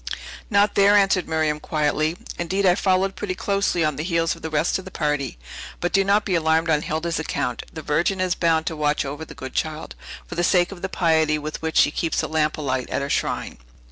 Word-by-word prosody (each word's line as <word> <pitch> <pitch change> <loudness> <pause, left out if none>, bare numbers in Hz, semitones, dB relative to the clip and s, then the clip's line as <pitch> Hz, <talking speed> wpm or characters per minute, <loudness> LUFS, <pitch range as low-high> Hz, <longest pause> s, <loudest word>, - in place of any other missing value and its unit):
"Not 205 -1 +3
there," 200 +1 +5
answered 195 -3 +3
Miriam 155 -1 0
quietly; 155 +2 0 0.2
"indeed, 190 +3 0
I 180 - +6
followed 190 +1 +1
pretty 185 -3 -3
closely 195 -4 0
on 150 -3 -1
the 150 - -2
heels 165 -1 0
of - - -15
the 160 - -4
rest 155 +4 +1
of 190 - -10
the - - -7
party. 150 - -2 0.4
But 175 - -2
do 195 - +4
not 200 +2 +2
be 190 - -1
alarmed 160 0 +2
on 150 -1 +3
Hilda's 160 +2 -2
account; 125 -6 -2
the 155 - -8
Virgin 170 +6 0
is 185 -1 +1
bound 165 -2 +1
to 160 - -2
watch 150 -1 0
over 145 +3 -5
the - - -12
good 130 0 -8
child, 155 0 -3 0.3
for - - -9
the 175 - -1
sake 175 0 +3
of 185 -3 -9
the 190 - -3
piety 160 -4 +2
with 150 +1 -6
which 160 0 -2
she 145 - +5
keeps 165 +1 -1
the - - -3
lamp 155 -1 0
alight 130 -4 -2
at - - -1
her 140 - -3
shrine. - - -2
160 Hz, 230 wpm, -23 LUFS, 155-185 Hz, 0.4 s, I